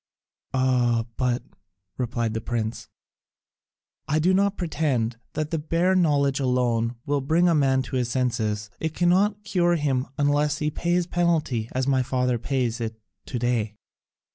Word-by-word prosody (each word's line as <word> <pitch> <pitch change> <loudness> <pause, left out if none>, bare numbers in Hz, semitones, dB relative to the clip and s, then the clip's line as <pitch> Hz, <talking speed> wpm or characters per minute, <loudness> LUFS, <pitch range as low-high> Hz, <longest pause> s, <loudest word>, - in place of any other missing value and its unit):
"Ah, 125 -3 +2
but," 125 -2 0 0.5
replied 115 -1 -2
the 110 - -2
prince, 115 -1 -3 1.2
"I 150 - +1
do 175 +4 +3
not 200 +1 +2
pretend 140 - -1 0.2
that 155 -1 -3
the 165 - 0
bare 165 +4 +1
knowledge 145 -6 +2
alone 125 -3 +1
will 145 0 0
bring 160 +6 +3
a 170 - +4
man 135 -3 +3
to 130 +1 -3
his 125 -2 0
senses, 110 -5 -1
it 160 -1 -3
cannot 195 +4 +2
cure 175 -4 +2
him 135 -5 0
unless 145 +1 +2
he 150 0 -1
pays 175 +3 +1
the 170 - -14
penalty 155 -10 +1
as 130 0 0
my 135 -1 +2
father 125 -1 0
pays 125 -2 -1
it 110 -1 -4 0.3
to 125 - -3
day." 115 -3 0
130 Hz, 155 wpm, -25 LUFS, 120-160 Hz, 1.2 s, a